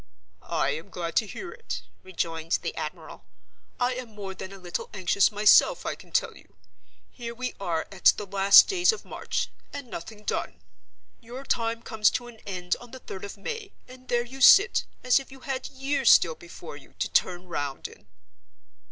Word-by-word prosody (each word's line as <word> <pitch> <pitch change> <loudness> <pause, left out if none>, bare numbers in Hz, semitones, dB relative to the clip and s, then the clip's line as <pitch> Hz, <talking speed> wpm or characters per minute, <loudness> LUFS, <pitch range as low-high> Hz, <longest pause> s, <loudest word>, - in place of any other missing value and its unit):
"I 165 -5 -1
am 160 +7 -6
glad 170 -3 -5
to 220 - +3
hear 350 - -7
it," 470 -1 -6 0.2
rejoined 165 -3 -3
the - - -3
admiral. - - -7 0.6
"I 250 0 +2
am 245 -4 -8
more 195 -2 -6
than 190 0 -8
a 195 - -10
little 180 -2 -5
anxious 190 +2 +3
myself, 215 - +5
I - - -1
can - - -15
tell - - 0
you. - - -19 0.6
Here 235 -2 -7
we 255 +1 -4
are 170 -5 -2
at - - -13
the 210 - -5
last 195 0 +7
days 365 0 +3
of 445 - -8
March—and 280 - -5
nothing 210 +5 -8
done! 90 - -3 0.6
Your 245 +4 -9
time 230 -3 -1
comes 215 -1 +3
to 245 - -11
an 240 -2 -12
end 180 -2 -2
on 245 - -12
the 260 - -9
third 190 - -9
of 200 +1 -7
May; 420 - -6
and 255 0 -14
there 240 0 +1
you 265 +2 -10
sit, 405 - +7 0.2
as 250 +1 +4
if 270 - -12
you 270 -1 -13
had 265 -1 -4
years 270 -1 0
still 165 - +6
before 170 -1 -11
you, 140 - -18
to - - -1
turn 180 0 0
round 145 -5 -4
in." - - -18
215 Hz, 185 wpm, -27 LUFS, 180-255 Hz, 0.6 s, last